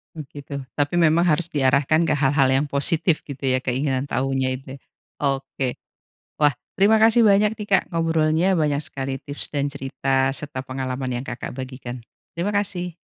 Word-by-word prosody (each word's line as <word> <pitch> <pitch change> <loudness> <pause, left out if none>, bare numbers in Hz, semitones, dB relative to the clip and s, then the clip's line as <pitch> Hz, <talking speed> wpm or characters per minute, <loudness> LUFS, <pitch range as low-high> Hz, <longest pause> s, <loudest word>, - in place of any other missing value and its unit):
Mmm, 155 - -6
gitu. 145 0 -8 0.2
Tapi 145 +3 0
memang 165 +1 +4
harus 170 0 +2
diarahkan 140 +1 +2
ke - - 0
hal-hal 135 0 +3
yang 135 +3 +2
positif 155 +4 +2
gitu 140 -2 -9
ya 130 0 +2
keinginan 130 +1 -1
tahunya 135 0 0
itu 135 0 -10
ya, - - -12 0.5
oke. 135 -2 -2 0.6
Wah 150 -1 +4 0.2
terima 215 +3 +4
kasih 230 +1 +5
banyak 210 +1 +4
nih, 210 -1 -7
Kak 195 - +5
ngobrolnya 165 0 +1
banyak 145 -2 +1
sekali 135 0 -4
tips 145 +1 -4
dan 145 0 -1
cerita 135 0 -1
serta 145 -3 -6
pengalaman 130 -1 -4
yang, - - -6
Kakak 125 -1 -6
bagikan. 130 -2 -7 0.3
Terima 175 +5 -1
kasih. 180 -4 -2
145 Hz, 165 wpm, -23 LUFS, 135-165 Hz, 0.6 s, kasih